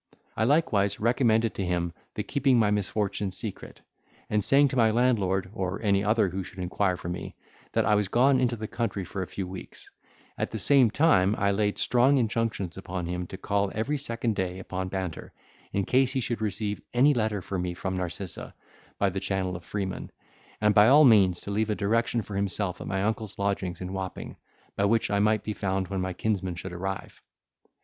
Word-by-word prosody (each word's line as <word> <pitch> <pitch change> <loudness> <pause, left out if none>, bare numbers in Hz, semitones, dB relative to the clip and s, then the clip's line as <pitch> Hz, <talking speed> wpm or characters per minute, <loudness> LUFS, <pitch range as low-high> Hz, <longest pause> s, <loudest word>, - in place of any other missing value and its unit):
I 110 - +1
likewise 115 -9 +2
recommended 115 -1 +2
to 100 - -3
him 85 -2 -1 0.2
the - - -2
keeping 135 -2 +2
my 105 -3 +3
misfortune 105 0 -1
secret, 95 +2 -7 0.5
and 105 -1 +2
saying 140 +4 +5
to 130 - -4
my 115 -3 +4
landlord, 100 -6 +1
or 95 -3 -3
any 100 -1 +2
other 105 -1 +2
who 95 +2 -4
should 95 - -13
inquire 90 +1 0
for 90 - -8
me, 90 +1 -5 0.4
that - - +2
I 105 - +3
was 105 -1 +2
gone 130 +5 +4
into 125 -2 +1
the 110 -1 -5
country 105 -5 -3
for 95 +2 -5
a 95 - -3
few 95 -2 -5
weeks: 95 0 -10 0.5
at - - -1
the - - -5
same 135 -5 +5
time 105 - +3
I 100 0 +2
laid 105 0 0
strong 125 +4 +3
injunctions 110 -6 -1
upon 90 -2 -5
him 90 +1 -3
to 95 - -8
call 100 0 0
every 140 +7 -1
second 115 -4 -2
day 95 -1 -2
upon 95 0 -4
Banter, 95 -3 -5 0.4
in 100 -1 -1
case 130 +3 +2
he 135 - 0
should 120 -2 -2
receive 105 0 -2
any 140 +4 +5
letter 110 -4 0
for 95 - -3
me 90 0 -3
from 95 +1 -3
Narcissa, 90 0 -5 0.4
by 100 -1 +1
the 95 - -3
channel 95 -2 -2
of 85 - -8
Freeman; 95 0 -4 0.5
and 105 -1 +3
by 105 +1 +7
all 145 +4 +7
means 100 -7 +5
to 100 - -6
leave 110 +2 0
a 105 - +1
direction 115 +2 0
for 100 - -8
himself 100 -1 0
at - - -6
my 95 0 -1
uncle's 110 -1 -2
lodgings 100 -3 -2
in 90 +1 -5
Wapping, 95 -1 -5 0.4
by 100 - +1
which 110 0 +1
I 100 - +2
might 105 0 +2
be 105 - -3
found 95 -2 -2
when 95 -2 -2
my 95 0 -2
kinsman 95 -3 -2
should 90 +1 -7
arrive. 95 +2 -5
100 Hz, 205 wpm, -27 LUFS, 95-115 Hz, 0.5 s, by